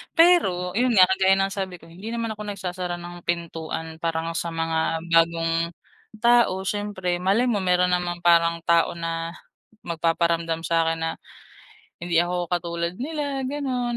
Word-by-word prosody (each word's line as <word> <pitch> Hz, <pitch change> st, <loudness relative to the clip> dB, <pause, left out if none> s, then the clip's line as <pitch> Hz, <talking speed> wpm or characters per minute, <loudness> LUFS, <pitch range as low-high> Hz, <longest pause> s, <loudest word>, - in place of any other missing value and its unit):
Pero 325 Hz, -, +4 dB
yun 240 Hz, +2 st, +1 dB
nga 185 Hz, -, +8 dB
kagaya 190 Hz, 0 st, +4 dB
ng 195 Hz, 0 st, 0 dB
sabi 190 Hz, -2 st, -4 dB
ko, 175 Hz, -, -17 dB
hindi 190 Hz, +6 st, -10 dB
naman 230 Hz, -1 st, -2 dB
ako 210 Hz, -1 st, -7 dB
nagsasara 180 Hz, -3 st, -4 dB
ng 175 Hz, 0 st, -9 dB
pintuan 165 Hz, -1 st, -4 dB
parang 165 Hz, 0 st, -2 dB
sa 165 Hz, -, -3 dB
mga 165 Hz, 0 st, -1 dB
bagong 165 Hz, 0 st, +3 dB, 0.7 s
tao, 235 Hz, -6 st, +4 dB
siyempre 190 Hz, -3 st, -2 dB
malay 195 Hz, +6 st, +2 dB
mo 210 Hz, -4 st, +1 dB
meron 180 Hz, -1 st, +2 dB
namang 175 Hz, -1 st, -1 dB
parang 170 Hz, -1 st, +4 dB
tao 170 Hz, 0 st, +3 dB
na 165 Hz, 0 st, -4 dB, 0.5 s
magpaparamdam 165 Hz, 0 st, 0 dB
sakin 165 Hz, -1 st, +1 dB
na, 165 Hz, -, 0 dB, 0.9 s
hindi 170 Hz, -1 st, +1 dB
ako 175 Hz, 0 st, -1 dB
katulad 170 Hz, 0 st, -1 dB
nila, 285 Hz, -1 st, -3 dB
ganun, 255 Hz, -4 st, -2 dB
175 Hz, 145 wpm, -24 LUFS, 165-195 Hz, 0.9 s, nga